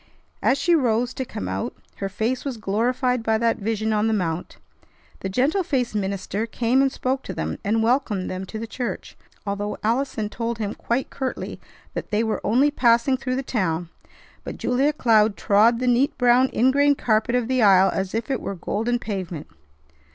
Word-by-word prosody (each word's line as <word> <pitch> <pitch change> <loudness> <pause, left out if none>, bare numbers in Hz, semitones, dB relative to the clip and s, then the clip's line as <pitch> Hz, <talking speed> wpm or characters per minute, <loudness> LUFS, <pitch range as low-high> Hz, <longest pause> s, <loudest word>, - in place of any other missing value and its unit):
As 265 - +3
she 345 +5 +2
rose 245 -4 +2
to 260 - -4
come 95 - -6
out, 95 +1 -3 0.2
her 195 - -3
face 225 +6 -2
was 270 -4 -4
glorified 240 +4 0
by 220 0 +1
that 230 0 +1
vision 220 +1 -1
on 210 +1 +2
the 220 - +2
mount. 170 -3 -3 0.6
The 190 - -4
gentle 275 - +1
faced 260 - -1
minister 200 +1 -2
came 240 +3 +1
and 270 -1 +2
spoke 260 +1 -2
to - - -7
them, - - -3
and 220 +2 +1
welcomed 225 -6 +1
them 185 +1 -4
to 220 - -6
the 225 - -4
church, 240 +2 -5 0.3
although 205 +1 -3
Allison 225 -1 0
told 230 +1 -3
him 210 -2 -3
quite 240 +3 -2
curtly 265 -2 -4 0.3
that - - -5
they 215 +1 +1
were 220 -1 -1
only 255 +8 +3
passing 240 -1 +3
through 255 -1 -3
the 270 - -2
town; 175 -9 -1 0.5
but - - -6
Julia 265 +4 +1
Cloud 220 -7 +3
trod 215 +4 +4
the 255 - -2
neat 250 +3 +2
brown 250 +1 +4
ingrain 280 +4 +3
carpet 225 -1 +1
of 245 -2 +1
the 255 -1 +1
aisle 195 -2 +6
as 190 +1 -2
if 230 +4 -2
it 265 - -1
were 195 - -4
golden 225 +7 -1
pavement. 185 -9 -5
230 Hz, 190 wpm, -23 LUFS, 205-255 Hz, 0.6 s, aisle